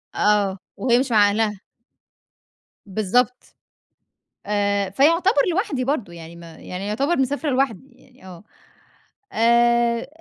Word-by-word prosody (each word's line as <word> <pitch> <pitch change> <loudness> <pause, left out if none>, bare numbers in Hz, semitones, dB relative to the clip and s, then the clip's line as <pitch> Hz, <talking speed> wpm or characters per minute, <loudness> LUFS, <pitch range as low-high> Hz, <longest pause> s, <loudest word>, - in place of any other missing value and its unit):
آه، 205 -2 +1 0.2
وهي 245 -1 +2
مش 260 -1 -2
مع 205 -2 +5
أهلها. 210 -1 -2 1.2
بالضبط. 220 +5 -1 0.9
آآ، 200 -1 0
فيُعتبر 335 - +3
لوحدي 330 - -1
برضو 250 - -2
يعني 170 0 -11
ما 170 -1 -13
يعني 185 +4 -7
يُعتبر 275 +11 0
مسافرة 285 +3 -1
لوحدي، 260 -3 -1
يعني 255 -3 -22
آه. 180 0 -12 0.9
آآ، 235 +1 +2
230 Hz, 110 wpm, -21 LUFS, 200-260 Hz, 1.2 s, مع